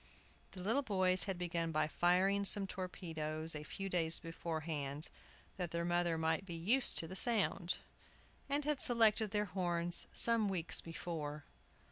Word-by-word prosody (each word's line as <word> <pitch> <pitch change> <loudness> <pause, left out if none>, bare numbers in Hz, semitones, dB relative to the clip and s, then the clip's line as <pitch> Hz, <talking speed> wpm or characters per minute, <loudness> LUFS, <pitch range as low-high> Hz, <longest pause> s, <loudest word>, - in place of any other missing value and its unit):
The 185 -2 -8
little 225 +8 +1
boys 185 -6 +1
had 195 -2 -3
begun 170 -2 -2
by 155 -1 0
firing 185 +5 +2
some 200 0 +3
torpedoes 160 -4 -3
a 150 - -6
few 195 +6 -6
days 165 -3 +1
beforehand, 160 -3 -2 0.5
that 180 -3 -3
their 170 +1 -3
mother 175 -1 0
might 160 +1 0
be 175 -3 -7
used 220 +11 +3
to 165 - 0
the 185 - -8
sound, 195 -5 +1 0.7
and 285 +1 -1
had 300 -2 0
selected 225 -3 +4
their 210 0 -1
horns 175 -2 +3
some 230 -3 +2
weeks 175 -3 0
before. 155 -3 -6
175 Hz, 150 wpm, -36 LUFS, 165-195 Hz, 0.7 s, selected